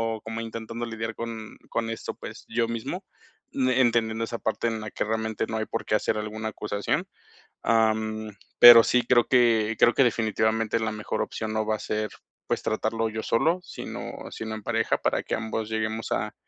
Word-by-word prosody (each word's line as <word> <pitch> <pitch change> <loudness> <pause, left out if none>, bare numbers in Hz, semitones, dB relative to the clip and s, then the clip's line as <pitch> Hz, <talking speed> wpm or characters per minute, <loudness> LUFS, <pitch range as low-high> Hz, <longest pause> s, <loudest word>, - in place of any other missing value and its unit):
O 110 - -10
como 115 +1 -5
intentando 115 +1 -5
lidiar 115 -1 -4
con 115 -2 -6
con 115 -1 -1
esto, 115 - -5
pues, - - -9
yo 115 0 +1
mismo, 115 -1 -4 0.5
mm, 130 -1 +1
entendiendo 115 -3 +2
esa 115 0 -5
parte 110 +1 -1
en 115 -1 -2
la 110 -1 -6
que - - -2
realmente 110 0 -1
no 110 - -3
hay 110 - -1
por 115 - -3
qué - - +1
hacer 110 - 0
alguna 110 +1 -4
acusación. 105 -2 -2 0.6
Am, 110 -1 +1 0.3
pero 120 -1 +11
sí, 125 - +3
creo 120 -2 +5
que 115 -3 +4
creo 120 - +5
que 135 - +5
definitivamente 110 -1 +1
la 110 -1 -1
mejor 105 0 -3
opción 110 -1 -4
no 110 0 +1
va 110 0 +1
a - - -12
ser, 110 0 -2 0.4
pues, - - -1
tratarlo 110 +1 -1
yo 110 0 -4
solo, 165 +12 +2
sino 180 - -7 0.2
sino 110 -1 -5
en 110 - -7
pareja, 115 -1 +1
para - - 0
que - - -3
ambos 110 -1 -3
lleguemos 110 0 -2
a, - - -1
110 Hz, 195 wpm, -26 LUFS, 110-115 Hz, 0.6 s, pero